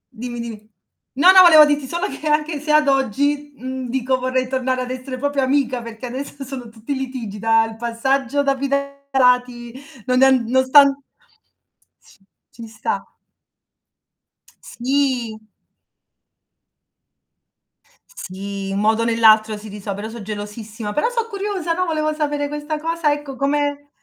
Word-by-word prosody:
Dimmi, 240 Hz, +1 st, -6 dB
dimmi. 220 Hz, -2 st, -8 dB, 0.5 s
No, 345 Hz, +8 st, +7 dB
no 375 Hz, 0 st, +8 dB
volevo 315 Hz, -4 st, +9 dB
dirti 290 Hz, -2 st, 0 dB
solo 345 Hz, +8 st, -2 dB
che 310 Hz, -, -6 dB
anche 300 Hz, 0 st, 0 dB
se 300 Hz, +1 st, -3 dB
ad 305 Hz, -1 st, +4 dB
oggi, 285 Hz, +3 st, 0 dB
mhmm, 260 Hz, +1 st, -5 dB
dico 260 Hz, 0 st, 0 dB
vorrei 255 Hz, 0 st, -1 dB
tornare 260 Hz, 0 st, -1 dB
ad 250 Hz, 0 st, -5 dB
essere 255 Hz, 0 st, -6 dB
proprio 285 Hz, +1 st, -1 dB
amica 260 Hz, -2 st, 0 dB
perché 230 Hz, +1 st, -9 dB
adesso 275 Hz, +3 st, -6 dB
sono 255 Hz, -3 st, -8 dB
tutti 225 Hz, +5 st, -6 dB
litigi, 255 Hz, -6 st, -5 dB
da 225 Hz, +1 st, +3 dB
il 225 Hz, 0 st, -8 dB
passaggio 265 Hz, +4 st, 0 dB
da 275 Hz, -1 st, +1 dB
fidanzati 265 Hz, -3 st, 0 dB, 0.3 s
non 255 Hz, 0 st, +2 dB
è -, -, +8 dB
an 260 Hz, -3 st, +3 dB
non 260 Hz, +2 st, +3 dB
sta 260 Hz, +3 st, +8 dB
an 280 Hz, 0 st, +1 dB, 1.5 s
Ci 230 Hz, -1 st, -10 dB
sta. 220 Hz, -1 st, -5 dB, 1.5 s
Sì. 250 Hz, -3 st, -1 dB, 2.7 s
Sì 195 Hz, -, -7 dB
un 195 Hz, -, -1 dB
modo 220 Hz, +2 st, +2 dB
o -, -, -1 dB
nell'altro 220 Hz, -2 st, +4 dB
si 210 Hz, +1 st, -11 dB
riso 200 Hz, 0 st, -6 dB
però 205 Hz, +3 st, -6 dB
so' 230 Hz, 0 st, -9 dB
gelosissima, 210 Hz, +1 st, -6 dB
però 300 Hz, -, +1 dB
so' 465 Hz, -2 st, -2 dB
curiosa, 395 Hz, -5 st, -3 dB
no, 365 Hz, +2 st, -1 dB
volevo 310 Hz, -2 st, -1 dB
sapere 295 Hz, -1 st, -2 dB
questa 295 Hz, +1 st, -4 dB
cosa, 330 Hz, -1 st, 0 dB
ecco 290 Hz, -2 st, -4 dB
come 285 Hz, +1 st, -1 dB
260 Hz, 145 wpm, -20 LUFS, 230-290 Hz, 2.7 s, volevo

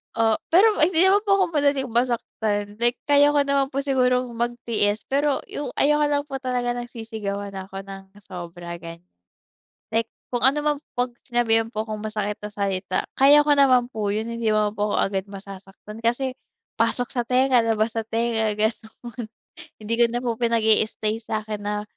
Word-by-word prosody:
O 225 Hz, -1 st, +3 dB, 0.2 s
pero 420 Hz, +5 st, +6 dB
hindi 345 Hz, +2 st, +4 dB
naman 405 Hz, +2 st, +4 dB
po 395 Hz, -1 st, +3 dB
ako 380 Hz, -, +4 dB
madaling 285 Hz, -2 st, +2 dB
masaktan 220 Hz, -3 st, -1 dB
like 240 Hz, +1 st, +2 dB
kaya 290 Hz, 0 st, +5 dB
ko 285 Hz, -1 st, +2 dB
naman 275 Hz, -1 st, +1 dB
po 275 Hz, -, -2 dB
sigurong 255 Hz, -2 st, +1 dB
magtiis. 230 Hz, -3 st, -1 dB
Pero 280 Hz, +1 st, +1 dB
yung 290 Hz, -, -5 dB
ayoko 295 Hz, +1 st, +4 dB
lang 290 Hz, -1 st, +1 dB
po 275 Hz, -, -6 dB
talaga 250 Hz, -2 st, -1 dB
nasisigawan 220 Hz, -4 st, -5 dB
ako 190 Hz, 0 st, -7 dB
ng 195 Hz, 0 st, -9 dB, 0.2 s
sobra, 175 Hz, -1 st, -7 dB
gan 170 Hz, 0 st, -9 dB, 1.0 s
Like 225 Hz, 0 st, 0 dB, 0.2 s
kung 245 Hz, -1 st, -3 dB
ano 275 Hz, +3 st, +4 dB
naman 295 Hz, 0 st, +1 dB, 0.2 s
'pag 245 Hz, 0 st, -2 dB
sinabihan 225 Hz, -2 st, +1 dB
po 215 Hz, -1 st, -3 dB
akong 215 Hz, 0 st, -5 dB
masakit 210 Hz, -1 st, -2 dB
na 210 Hz, -, -5 dB
salita, 195 Hz, -2 st, -2 dB
kaya 290 Hz, +2 st, +6 dB
ko 290 Hz, -, +5 dB
naman 255 Hz, -3 st, +4 dB
po 215 Hz, -4 st, -3 dB
yun, 215 Hz, +2 st, -2 dB
hindi 230 Hz, -1 st, -1 dB
naman 210 Hz, 0 st, +1 dB
po 210 Hz, 0 st, -1 dB
ako -, -, 0 dB
agad 195 Hz, -1 st, 0 dB
masasaktan. 200 Hz, +3 st, -11 dB
Kasi 255 Hz, +2 st, 0 dB, 0.4 s
pasok 245 Hz, -1 st, 0 dB
sa 245 Hz, -, +1 dB
tenga, 255 Hz, -1 st, +3 dB
labas 225 Hz, 0 st, 0 dB
sa 225 Hz, -, -1 dB
tenga, 225 Hz, -1 st, 0 dB
gano'n. 220 Hz, +2 st, -4 dB, 0.5 s
Hindi 215 Hz, +2 st, -2 dB
ko 240 Hz, -, +7 dB
na 240 Hz, +1 st, -2 dB
pinag-i-stay 225 Hz, -2 st, +1 dB
sa'kin 215 Hz, -1 st, -4 dB
na 210 Hz, 0 st, -3 dB
230 Hz, 170 wpm, -23 LUFS, 210-260 Hz, 1.0 s, ko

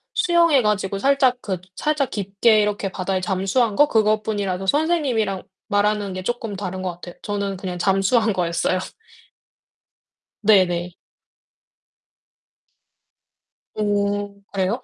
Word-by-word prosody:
수영해 335 Hz, -6 st, +4 dB
가지고 205 Hz, -2 st, 0 dB
살짝 270 Hz, -1 st, +3 dB
그 190 Hz, -3 st, -3 dB, 0.2 s
살짝 300 Hz, 0 st, 0 dB
깊게 205 Hz, +2 st, +2 dB
이렇게 205 Hz, -2 st, -1 dB
바다에 185 Hz, 0 st, -2 dB
잠수한 195 Hz, +5 st, 0 dB
거 295 Hz, -, +5 dB
그것뿐이라서 210 Hz, -4 st, 0 dB
선생님이랑 270 Hz, -, +1 dB, 0.3 s
말하는 205 Hz, -1 st, +1 dB
게 185 Hz, 0 st, -5 dB
쪼끔 235 Hz, -2 st, -3 dB
다른 185 Hz, -1 st, -5 dB
것 185 Hz, -1 st, -2 dB
같아요. 175 Hz, 0 st, -11 dB
저는 200 Hz, -2 st, -3 dB
그냥 180 Hz, -1 st, -5 dB
잠수한 195 Hz, +4 st, +2 dB
거였어요. 175 Hz, +1 st, 0 dB, 1.7 s
네네. 180 Hz, -4 st, +3 dB, 2.8 s
오 205 Hz, -1 st, -1 dB
그래요? 195 Hz, +5 st, -1 dB
205 Hz, 255 characters per minute, -22 LUFS, 190-225 Hz, 2.8 s, 거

